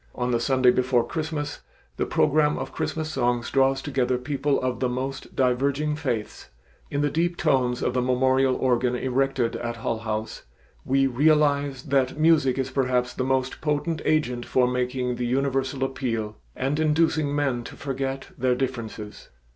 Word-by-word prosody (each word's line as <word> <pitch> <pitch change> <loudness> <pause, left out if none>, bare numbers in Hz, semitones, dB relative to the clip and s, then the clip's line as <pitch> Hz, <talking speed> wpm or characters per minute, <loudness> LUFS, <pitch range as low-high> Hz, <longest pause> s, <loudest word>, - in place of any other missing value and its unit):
On 125 0 -1
the 120 - +2
Sunday 130 +1 +4
before 125 -1 +2
Christmas 155 -2 -4 0.4
the - - -1
program 150 0 +2
of 135 +1 -5
Christmas 155 0 -3
songs 120 -3 0
draws 135 0 +2
together 130 -3 0
people 140 +2 0
of 125 -2 -2
the 125 - +1
most 130 +2 -5
diverging 140 +4 +1
faiths. 125 -9 -4 0.4
In 145 - -1
the 145 -1 +1
deep 170 +2 0
tones 125 -5 +1
of 125 - 0
the 125 - +1
memorial 130 +1 +2
organ 125 -1 +1
erected 130 -2 0
at 120 0 -4
Hull 115 -1 -2
House, 110 -1 -4 0.4
we 135 +1 +2
realize 140 0 +2
that 135 -1 +1
music 155 -5 +3
is 130 0 -2
perhaps 125 -2 0
the - - -2
most 130 0 -1
potent 155 +1 -1
agent 125 -6 +1
for 125 +1 +2
making 125 0 -1
the 125 - -1
universal 135 +1 0
appeal 115 -5 -2 0.2
and 135 +3 -1
inducing 155 -1 +2
men 135 -5 0
to - - -9
forget 135 -1 -4
their 125 0 +1
differences. 115 -5 -5
130 Hz, 160 wpm, -25 LUFS, 125-145 Hz, 0.4 s, Sunday